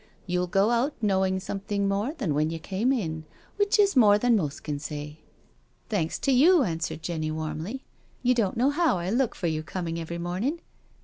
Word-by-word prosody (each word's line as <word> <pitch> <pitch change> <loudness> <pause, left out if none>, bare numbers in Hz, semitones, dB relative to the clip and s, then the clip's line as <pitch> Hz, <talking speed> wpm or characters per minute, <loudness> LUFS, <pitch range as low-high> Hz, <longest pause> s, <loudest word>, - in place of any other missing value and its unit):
You'll 180 0 -1
go 195 +5 +2
out 245 +5 +1
knowing 190 -3 +1
something 200 +1 -2
more 205 +10 -1
than 170 - -1
when 150 +2 +1
you 165 - -4
came 195 +9 -1
in, 160 -11 -2 0.3
which 410 +3 +2
is 400 -4 +4
more 210 -5 +6
than 240 +2 +3
most 155 -9 -2
can 145 -2 -3
say." 150 0 -6 0.3
" - - -39
Thanks 170 -6 0
to 275 - +2
you," 305 +5 +6
answered 165 -4 -3
Jenny 160 -3 -2
warmly. 160 - -4 0.2
" - - -35
You 250 0 +4
don't 230 -3 0
know 260 +4 +3
how 320 - +2
I 175 +2 -3
look 245 +1 +1
for 180 - -5
your 160 -2 0
coming 165 0 -4
every 170 +1 -5
morning. 185 - -2
195 Hz, 200 wpm, -26 LUFS, 165-245 Hz, 0.3 s, more